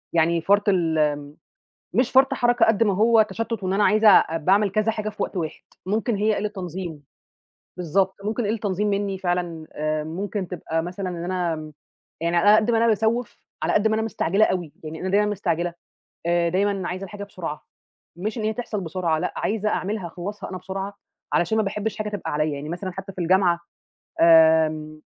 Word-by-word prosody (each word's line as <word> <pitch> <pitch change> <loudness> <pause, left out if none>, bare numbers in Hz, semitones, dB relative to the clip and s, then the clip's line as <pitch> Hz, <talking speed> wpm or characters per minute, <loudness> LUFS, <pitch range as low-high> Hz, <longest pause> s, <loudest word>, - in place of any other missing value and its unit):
يعني 165 +1 +3
فَرْط 200 +3 +3
الم 155 -5 +1 0.6
مش 250 - +2
فَرْط 270 +1 +5
حركة 245 -1 +3
قد 225 0 +3
ما 205 -3 +2
هو 225 +2 +5
تشتُّت 225 -3 -4
وإن 185 +1 0
أنا 205 +1 +2
عايزة 215 +1 +5
أ 165 -4 +5
باعمل 195 +5 +3
كذا 215 +2 +1
حاجة 215 -1 -3
في 210 - -4
وقت 190 - -4
واحد، 160 -3 -4 0.2
ممكن 215 +3 0
هي 210 +1 +1
قِلّة 210 +1 -1
تنظيم، 180 -6 -6 0.7
بالضبط، 185 +2 +1
ممكن 220 +1 -1
قِلّة 220 +2 -1
تنظيم 205 0 -1
منّي 200 -1 -1
فعلًا، 175 -3 -2
آآ 155 0 -2
ممكن 190 +3 -4
تبقى 165 -2 -3
مثلًا 185 +2 -4
إن 175 -1 -5
أنا 175 -3 -1
م 155 0 -8 0.5
يعني 170 +1 0
على 170 +4 +4
أنا 215 - +8
قد 220 +2 +2
ما 225 - +3
أنا 230 - +3
باسَوّف، 225 +2 0 0.2
على - - +1
قد 215 +1 +3
ما 220 - +1
أنا 220 - 0
مستعجلة 210 -2 +1
أوي. 175 -5 -2
يعني 155 +1 -7
أنا 185 - -3
دايمَا 205 +2 +3
مستعجلة، 175 -4 -1 0.5
آآ 170 0 +2
دايمًا 195 0 0
عايزة 185 +2 -4
الحاجة 205 +1 -7
بسرعة 170 -6 -7 0.5
مش 215 +5 -3
إن - - -3
هي 220 - +1
تحصل 220 -3 -4
بسرعة 165 -2 -1
لأ، - - -2
عايزة 215 0 -1
أعملها، 200 -2 -2
أخلّصها 190 +5 -6
أنا 185 - -5
بسرعة، 195 +2 -5 0.4
علشان 220 +6 +2
ما 215 - +2
باحبّش 210 +2 -3
حاجة 215 0 -2
تبقى 205 -6 -4
عليّا. 150 0 0
يعني 145 +2 -6
مثلًا 180 +2 -4
حتّى 195 +1 -8
في 185 - -8
الجامعة 175 0 +3 0.6
آمم 160 -2 +5
190 Hz, 195 wpm, -23 LUFS, 170-210 Hz, 0.7 s, أنا